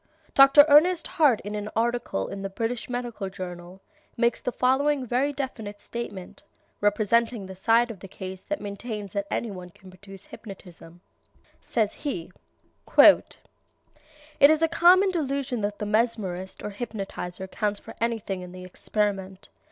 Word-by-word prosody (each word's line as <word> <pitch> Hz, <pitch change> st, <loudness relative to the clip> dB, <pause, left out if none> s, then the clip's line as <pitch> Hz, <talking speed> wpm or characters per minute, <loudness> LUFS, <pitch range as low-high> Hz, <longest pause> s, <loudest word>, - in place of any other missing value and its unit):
Dr. 275 Hz, +1 st, +8 dB
Ernest 320 Hz, +4 st, +5 dB
Hart 285 Hz, -8 st, +3 dB
in 205 Hz, -, -6 dB
an 210 Hz, 0 st, -4 dB
article 235 Hz, -, -1 dB
in 200 Hz, -, -7 dB
the 195 Hz, -, -4 dB
British 225 Hz, +5 st, -3 dB
Medical 240 Hz, -5 st, -4 dB
Journal 180 Hz, 0 st, -9 dB, 0.4 s
makes 235 Hz, 0 st, +1 dB
the 250 Hz, -, -2 dB
following 265 Hz, +3 st, +1 dB
very 255 Hz, +4 st, 0 dB
definite 240 Hz, -7 st, -6 dB
statement, 205 Hz, -6 st, -7 dB, 0.4 s
representing 215 Hz, +1 st, +1 dB
the 190 Hz, 0 st, -9 dB
side 230 Hz, +5 st, +2 dB
of 205 Hz, -, -11 dB
the 195 Hz, -, -10 dB
case 190 Hz, 0 st, -8 dB
that 300 Hz, -, -3 dB
maintains 205 Hz, 0 st, -6 dB
that 200 Hz, -1 st, -2 dB
any 230 Hz, -, -2 dB
one 180 Hz, -2 st, -9 dB
can 185 Hz, +2 st, -16 dB
produce 195 Hz, +1 st, -13 dB
hypnotism. 175 Hz, -4 st, -12 dB, 0.6 s
Says 215 Hz, -3 st, 0 dB
he: 225 Hz, -, -5 dB, 0.7 s
"It -, -, +7 dB, 1.1 s
is 315 Hz, +1 st, +3 dB
a -, -, +5 dB
common 365 Hz, +4 st, +5 dB
delusion 275 Hz, -7 st, -2 dB
that 205 Hz, 0 st, -2 dB
the 210 Hz, -, -4 dB
mesmerist 210 Hz, -4 st, -1 dB
or 210 Hz, -, -4 dB
hypnotizer 195 Hz, -4 st, -5 dB
counts 205 Hz, +1 st, -2 dB
for 225 Hz, -, -11 dB
anything 225 Hz, -5 st, -2 dB
in 180 Hz, 0 st, -10 dB
the 185 Hz, 0 st, -9 dB
experiment. 195 Hz, +1 st, -3 dB
210 Hz, 150 wpm, -26 LUFS, 195-245 Hz, 1.1 s, Dr